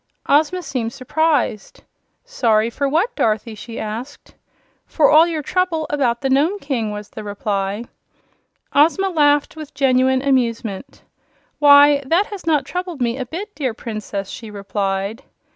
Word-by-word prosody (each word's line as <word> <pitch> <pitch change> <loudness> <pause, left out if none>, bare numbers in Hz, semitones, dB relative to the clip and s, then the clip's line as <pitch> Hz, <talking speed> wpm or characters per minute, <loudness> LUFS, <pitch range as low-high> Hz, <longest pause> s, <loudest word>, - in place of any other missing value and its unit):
Ozma 315 +5 +2
seemed 255 -6 -3
surprised. 270 -4 -1 0.4
"Sorry 230 - +1
for 280 +4 -1
what, 340 - 0
Dorothy?" 220 +1 0
she 225 +2 -8
asked. 230 +7 -7 0.5
"For 295 -4 +3
all 315 +2 +7
your 320 -3 -3
trouble 350 -1 0
about 250 -5 0
the 270 - -1
Nome 305 +9 +2
King," 260 - -3
was 210 0 -7
the 215 - -8
reply. 205 0 -3 0.9
Ozma 335 +7 +3
laughed 295 -4 +2
with 310 -3 -10
genuine 260 -1 +2
amusement. 235 -5 -1 0.6
"Why, 285 -1 +7
that 335 +9 +2
has 390 -5 -8
not 300 -4 +2
troubled 355 +1 -5
me 240 +1 -1
a 255 - -4
bit, 390 - -7
dear 260 -6 -3
Princess," 215 -4 -5
she 225 -3 -8
replied. 200 +2 -3
270 Hz, 145 wpm, -19 LUFS, 225-310 Hz, 0.9 s, all